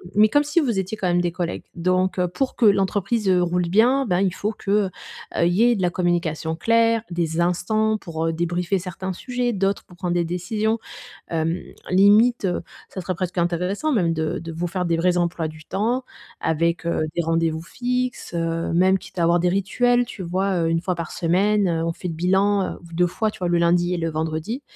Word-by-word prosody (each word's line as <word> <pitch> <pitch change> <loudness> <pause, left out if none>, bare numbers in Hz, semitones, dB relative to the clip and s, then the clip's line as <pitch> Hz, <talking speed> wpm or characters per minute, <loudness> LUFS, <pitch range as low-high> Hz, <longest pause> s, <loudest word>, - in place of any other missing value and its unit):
mais 215 +1 +6
comme 290 +6 +3
si 295 +3 +1
vous 235 -9 0
étiez 190 +3 -3
quand 190 - -1
même 175 0 +2
des 175 -1 0
collègues 175 -1 -4
donc 185 +2 +1
heu, 180 -1 +2
pour 255 +10 -2
que 235 - +2
l'entreprise, 200 +1 +2
heu, 185 -1 +4
roule 175 0 0
bien, 245 +8 +3
ben, 180 -2 +1
il 190 -2 +1
faut 210 +3 -2
que, 205 -2 -5
heu, 205 -2 +3 0.6
il - - +4
y 195 - +2
ait 240 0 +4
de 195 - -3
la 175 - +2
communication 170 -3 -1
claire, 230 +3 +2
des 170 -1 -1
instants 215 +5 +1
pour 165 -2 -3
débriefer 175 +3 -1
certains 185 +1 -5
sujets, 245 +4 -2
d'autres 195 0 0
pour 180 - -16
prendre 175 -1 -2
des 175 -1 +1
décisions. 210 +6 -1 0.5
Hem, 165 +1 -1 0.3
limite, 205 +6 +5
heu, 180 -2 0 0.3
ça 190 - -6
serait 185 +1 -3
presque 180 +1 -4
intéressant 180 - 0
même 180 - +2
de 160 -1 -2
de 165 0 -7
vous 170 +2 -3
faire 180 +1 -2
des 170 -1 0
vrais 180 +1 +2
emplois 170 -2 0
du 155 0 -12
temps 230 +9 -1 0.4
avec, 170 +2 0
heu, 170 - 0 0.2
des 170 - +2
rendez-vous 165 -1 0
fixes, 250 +3 -3
heu, 165 0 -1
même 185 +2 +4
quitte 185 - -13
à - - +2
avoir 170 +1 +3
des 180 - +2
rituels, 245 +6 +2
tu 215 - -8
vois? 185 +2 0
Heu, - - +1
1 165 0 0
fois 185 - -1
par 170 -2 -5
semaine, 195 +4 +2
heu, 165 -1 0
on 165 - 0
fait 180 - -6
le 165 - -4
bilan, 190 +4 +1
heu, - - -12
v 170 - -13
2 175 +1 +2
fois, 215 +5 -1
tu - - -14
vois? 180 - -1
Le 175 - +2
lundi 175 +1 +2
et - - 0
le 165 -1 -2
vendredi. 160 - -3
180 Hz, 225 wpm, -22 LUFS, 170-205 Hz, 0.6 s, mais